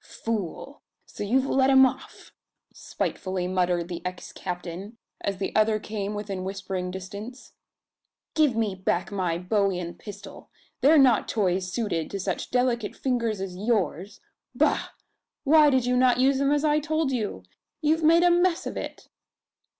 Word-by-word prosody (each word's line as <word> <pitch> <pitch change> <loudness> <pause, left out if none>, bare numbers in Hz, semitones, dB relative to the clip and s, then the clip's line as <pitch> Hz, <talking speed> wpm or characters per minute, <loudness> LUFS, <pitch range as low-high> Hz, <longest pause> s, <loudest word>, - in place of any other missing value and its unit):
"Fool! 225 - -5 0.2
So - - -7
you've 255 +6 +2
let 270 0 +2
him 265 -1 +7
off?" 260 - -5 0.4
spitefully 185 -1 -3
muttered 180 -2 0
the 175 -1 -6
ex 180 0 -6
captain, 180 +4 -6 0.3
as 200 -1 -2
the 195 - -4
other 215 0 +3
came 210 -1 -4
within 200 -3 -4
whispering 190 -1 -4
distance. 200 +7 -8 0.8
"Give 300 -6 +3
me 220 -3 0
back 185 0 -1
my 180 -4 -1
bowie 195 +1 0
and 175 -1 -6
pistol. 205 -1 -10 0.3
They're 305 +4 +5
not 255 -6 +5
toys 185 -3 0
suited 185 -8 -2
to 200 - -4
such 190 -1 -3
delicate 245 -3 0
fingers 235 -5 -1
as 190 -1 -5
yours! 200 -3 -1 0.3
Bah! - - +1 0.5
Why 300 +1 +6
did 260 -3 +2
you 250 0 +1
not 250 -1 +4
use 265 +1 +3
them 280 0 +2
as 295 +1 +2
I 300 0 +3
told 310 -1 -1
you? 215 - -3 0.4
You've 315 +1 +1
made 330 +2 +5
a 355 - +5
mess 350 0 +2
of - - -5
it!" - - -7
215 Hz, 160 wpm, -26 LUFS, 185-265 Hz, 0.8 s, him